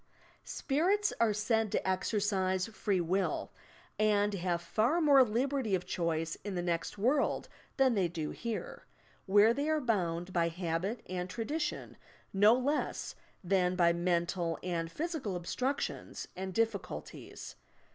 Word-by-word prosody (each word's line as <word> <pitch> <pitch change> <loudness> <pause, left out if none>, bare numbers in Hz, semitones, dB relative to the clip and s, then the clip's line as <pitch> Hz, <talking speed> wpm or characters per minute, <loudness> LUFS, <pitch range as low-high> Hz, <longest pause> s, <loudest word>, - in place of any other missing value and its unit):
"Spirits" 380 +9 +1
are 230 -2 +4
said 215 0 +1
to - - -1
exercise 190 -1 +1
free 210 -3 -1
will 180 +3 -1 0.5
and 210 -1 +3
have 175 -2 -1
far 225 - +1
more 285 -5 +7
liberty 245 -1 0
of 180 - -3
choice 165 -2 -1
in 205 -1 -4
the 175 - -1
next 170 +2 -2
world 260 +8 +1 0.3
than 265 -2 +4
they 195 -5 +2
do 160 -3 -4
here 230 -2 -5 0.2
— - - -32
where 205 +4 +6
they 285 +4 -1
are 310 0 +2
bound 180 - -1
by 170 -1 +2
habit 175 +6 -2
and 180 0 -3
tradition 285 +11 -3 0.4
no 205 +4 +6
less 280 +4 -1 0.3
than 180 0 +2
by 170 -2 +4
mental 170 -1 0
and 165 -2 -2
physical 310 - -3
obstructions 255 +11 -3
and 190 0 -5
diffi 225 -3 +1
culties. - - -9
200 Hz, 140 wpm, -32 LUFS, 175-235 Hz, 0.5 s, more